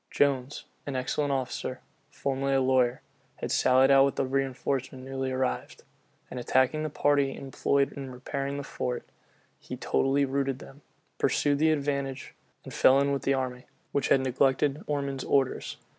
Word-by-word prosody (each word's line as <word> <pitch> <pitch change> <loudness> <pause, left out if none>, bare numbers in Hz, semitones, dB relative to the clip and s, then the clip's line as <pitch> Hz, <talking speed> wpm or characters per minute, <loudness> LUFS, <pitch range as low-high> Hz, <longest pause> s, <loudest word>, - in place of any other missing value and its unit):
Jones, 140 -1 0 0.2
an 140 - -3
excellent 140 +3 -1
officer, 130 -2 -3 0.3
formerly 135 0 -1
a - - +4
lawyer, 130 -1 +2 0.3
had - - -5
sallied 130 +1 +4
out 135 0 +7
with 140 - +1
the 135 - 0
reënforcement 130 0 -2
newly 135 0 -3
arrived; 130 - -2 0.5
and 125 - -5
attacking 130 +5 +2
the 155 - -2
party 145 -1 +2
employed 140 +1 0
in 135 -1 -7
repairing 140 +2 -4
the 145 - -4
fort, 125 -2 -4 0.5
he - - -7
totally 140 +1 +1
routed 135 -1 -1
them, 140 +1 -13 0.4
pursued 145 -1 +2
the 160 +1 +4
advantage, 140 -3 -2 0.3
and - - -9
fell 135 +1 +5
in 140 0 +2
with 140 -2 -1
the 135 +1 +1
army, 130 -1 -3 0.3
which 140 - 0
had 135 - +4
neglected 135 +3 +1
Ormond's 140 -2 -2
orders. 135 -2 0
135 Hz, 160 wpm, -28 LUFS, 130-140 Hz, 0.5 s, out